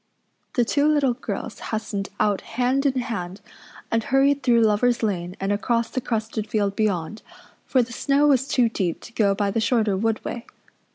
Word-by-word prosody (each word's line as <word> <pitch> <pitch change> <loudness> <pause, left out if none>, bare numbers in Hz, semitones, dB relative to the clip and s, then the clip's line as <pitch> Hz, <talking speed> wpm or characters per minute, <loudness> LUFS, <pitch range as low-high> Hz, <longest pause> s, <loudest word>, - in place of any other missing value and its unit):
The 245 - +3
two 285 +5 +2
little 290 -4 +3
girls 250 - -6
hastened 215 -2 -4
out 205 -2 +1
hand 255 +3 0
in 260 -2 0
hand 195 -6 -5 0.5
and 230 0 +1
hurried 275 +3 +2
through 235 -3 +4
Lover's 225 +3 +2
Lane 180 -4 -2
and 195 +1 -1
across 230 +3 0
the 255 - -2
crusted 220 -2 -3
field 200 -2 0
beyond, 205 -2 -1 0.5
for 255 -2 +3
the 235 0 -9
snow 280 +4 +2
was 270 -2 +3
too 250 -4 +3
deep 190 -6 -2
to 240 - -12
go 200 -4 +2
by 200 0 0
the 225 - 0
shorter 220 -3 +2
wood 220 +3 -1
way. 235 - -5
225 Hz, 180 wpm, -23 LUFS, 205-255 Hz, 0.5 s, through